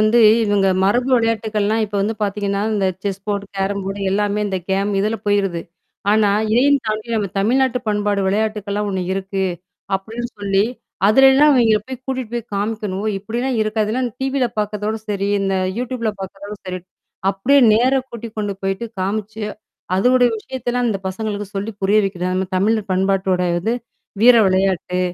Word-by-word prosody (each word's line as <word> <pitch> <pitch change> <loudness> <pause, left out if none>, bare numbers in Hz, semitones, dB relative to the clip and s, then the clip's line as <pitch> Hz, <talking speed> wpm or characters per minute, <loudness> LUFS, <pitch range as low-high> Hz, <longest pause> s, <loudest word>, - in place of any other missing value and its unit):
வந்து 215 +3 +4 0.3
இவங்க 205 -2 +2 0.2
மரபு 245 +6 +2
விளையாட்டுக்கள்னா 220 -2 0
இப்ப 205 - -10
வந்து 215 +3 0
பாத்தீங்கன்னா, 200 0 -1
இந்த 200 -2 +1 0.2
செஸ் 195 -1 -3
போர்ட் 200 -1 -1
கேரம் 195 +1 -1
போர்ட் 195 +1 -4
எல்லாமே, 205 +1 0
இந்த 190 -1 -1
கேம் 195 +2 +1
இதுல 215 +3 0
போயிருது. 195 -4 +1 0.5
ஆனா 210 -1 +4 0.2
இதையும் 280 +4 +4
தாண்டி 215 +1 -2
நம்ம 210 -2 0
தமிழ்நாட்டு 250 +4 +2
பண்பாடு 205 -1 0
விளையாட்டுகள்லாம் 210 0 -1
ஒண்ணு 190 -1 -2
இருக்கு 195 0 -2 0.5
அப்படின்னு 225 +5 -6
சொல்லி, 200 -1 +2 0.4
அதுலல்லாம் 270 +6 +6
இவங்கள 225 -4 +4
போய் 260 -1 -7
கூட்டிட்டு 260 -4 -3
போய் 235 -1 -5
காமிக்கணும். 205 -1 -2
"ஓ! - - +1
இப்படிலாம் 235 +5 -2
இருக்கா?" 215 0 0
இதெல்லாம் 245 +4 -1
டிவில 265 -1 +1
பாக்குறதோட 210 +1 -2
சரி. 200 -1 -1
இந்த 195 -1 0 0.2
யூடியூப்ல 245 -2 -2
பாக்குறதோட 195 +2 -7
சரி. 185 0 -3 0.5
அப்படியே 220 +9 +3 0.2
நேர 250 +4 +3 0.2
கூட்டி 235 0 -7
கொண்டு 205 -1 -1
போயிட்டு 195 +4 -2
காமிச்சு, 210 +3 -3 0.5
அதனுடைய 245 +5 +4
விஷயத்தலாம் 245 +1 -2
இந்த 205 -3 -1
பசங்களுக்கு 205 +1 -4
சொல்லி 200 +3 -3
புரிய 200 +3 +4
வைக்கிறது. 185 -2 -2
அந்த 190 0 -1
தமிழர் 210 +2 +1
பண்பாட்டோட 190 0 +1 0.2
வந்து 220 +7 -1 0.5
வீர 245 +1 +8
விளையாட்டு. 185 -1 +1
210 Hz, 155 wpm, -19 LUFS, 195-230 Hz, 0.5 s, வீர